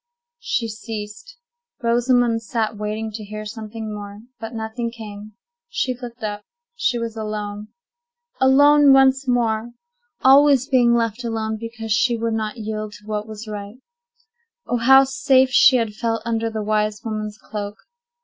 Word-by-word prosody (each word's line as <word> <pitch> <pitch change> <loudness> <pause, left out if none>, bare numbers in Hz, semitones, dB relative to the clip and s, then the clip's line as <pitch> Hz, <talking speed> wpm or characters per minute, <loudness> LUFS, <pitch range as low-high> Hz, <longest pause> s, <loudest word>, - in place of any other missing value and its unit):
She 235 - -1
ceased. 225 - -8 0.5
Rosamond 240 0 +2
sat 225 0 -2
waiting 215 +1 -4
to 215 0 -7
hear 215 +1 -7
something 220 0 -6
more; 205 0 -8 0.2
but 225 +1 -7
nothing 225 +1 -3
came. 215 -2 -10 0.4
She 260 - -1
looked 240 -1 -10
up; 205 -1 -4 0.3
she 245 - 0
was 230 -1 -4
alone. 210 -1 -5 0.7
Alone 285 +2 +6
once 270 0 +4
more! 235 -1 0 0.5
Always 275 -1 +6
being 245 -4 +4
left 230 0 -1
alone, 220 -1 -2
because 225 0 -7
she 215 +4 +2
would 230 0 -1
not 220 0 -3
yield 215 -1 -5
to 210 - -14
what 210 0 -3
was 215 0 -8
right! 205 0 -7 0.9
Oh, 245 - -1
how 265 +3 +7
safe 265 -1 +3
she 260 0 +6
had 225 -4 0
felt 225 +1 -2
under 230 -1 -1
the 220 -1 -4
wise 210 0 -1
woman's 215 -1 -4
cloak! 205 -1 -6
225 Hz, 150 wpm, -21 LUFS, 215-245 Hz, 0.9 s, how